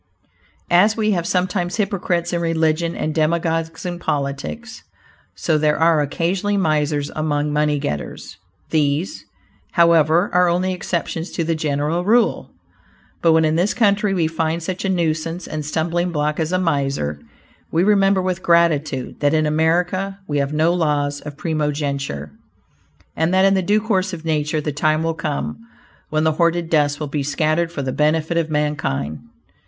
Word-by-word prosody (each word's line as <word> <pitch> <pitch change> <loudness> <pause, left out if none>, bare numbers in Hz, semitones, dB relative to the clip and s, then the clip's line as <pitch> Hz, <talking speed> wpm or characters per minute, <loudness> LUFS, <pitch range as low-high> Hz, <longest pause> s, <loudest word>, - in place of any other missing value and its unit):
As 205 +6 +4
we 215 -1 +1
have 175 -4 -1
sometimes 180 -1 0
hypocrites 185 -4 -1
in 170 - 0
religion, 165 0 0
and 155 - -2
demagogues 165 +1 -1
in 175 -1 -4
politics, 145 +12 -4 0.5
so 155 -2 0
there 150 0 +2
are 160 -1 +4
occasionally 185 +7 -1
misers 150 -4 0
among 150 -1 -1
money 150 0 +1
getters. 105 - -5 0.3
These, 155 - 0 0.5
however, 170 +1 +4
are 180 0 +4
only 185 +2 0
exceptions 170 -1 -3
to 170 - -1
the 165 +1 0
general 155 +2 -1
rule. 225 +4 +2 0.7
But 165 -1 +4
when, 160 0 +4
in 155 +1 +1
this 185 +5 +1
country, 205 -3 +2
we 170 -3 +1
find 160 +1 -1
such 185 +2 -4
a 195 - 0
nuisance 165 -1 -1
and 155 -1 -4
stumbling 170 +4 -1
block 150 -1 -1
as 160 +1 -1
a 185 - +2
miser, 140 - -1 0.5
we 170 - +2
remember 195 -2 +3
with 185 0 -2
gratitude 155 -7 +1
that 145 +1 +2
in 155 0 +2
America 175 +5 0
we 145 -1 0
have 140 0 -1
no 160 +3 +2
laws 145 -4 0
of 145 -1 -9
primogeniture, 145 - -2 0.8
and 160 +2 +1
that 190 +1 +5
in 195 - +4
the 190 - +2
due 205 +4 +2
course 190 -4 0
of 165 -1 -7
nature 155 -1 0
the 150 - -2
time 155 +2 +1
will 165 0 0
come 150 +3 -3 0.5
when 155 0 0
the 160 - +3
hoarded 170 +1 0
dust 145 -2 +2
will 155 - -2
be 145 0 -3
scattered 155 +4 0
for 145 -5 -4
the 130 -1 -2
benefit 155 +2 +1
of 165 -1 0
mankind. 130 - -1
160 Hz, 165 wpm, -20 LUFS, 150-175 Hz, 0.8 s, that